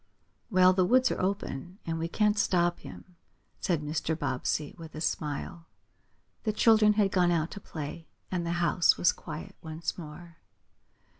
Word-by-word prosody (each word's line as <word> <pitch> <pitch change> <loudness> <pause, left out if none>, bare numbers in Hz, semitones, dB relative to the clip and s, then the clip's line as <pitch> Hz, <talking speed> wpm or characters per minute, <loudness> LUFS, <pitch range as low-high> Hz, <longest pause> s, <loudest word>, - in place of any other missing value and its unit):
"Well, 185 -3 +5
the 185 0 +3
woods 255 +7 +4
are - - -2
open, 185 -3 -3
and 165 -1 -2
we 165 - -1
can't 210 +3 +1
stop 175 -3 +2
him," 180 -2 -12 0.4
said 165 -5 0
Mr. 155 +1 -2
Bobbsey, 145 +1 -2
with 160 -2 -11
a - - -5
smile. 155 +1 -3 0.8
The 215 - 0
children 215 -1 +5
had 205 -2 +2
gone 180 -2 +3
out 165 -1 0
to 205 - -7
play, 160 -2 -7 0.2
and 180 -2 -1
the 170 0 -1
house 175 0 +3
was 175 - +4
quiet 155 -1 -8
once 160 +2 -5
more. 165 +1 -10
170 Hz, 160 wpm, -29 LUFS, 160-185 Hz, 0.8 s, Well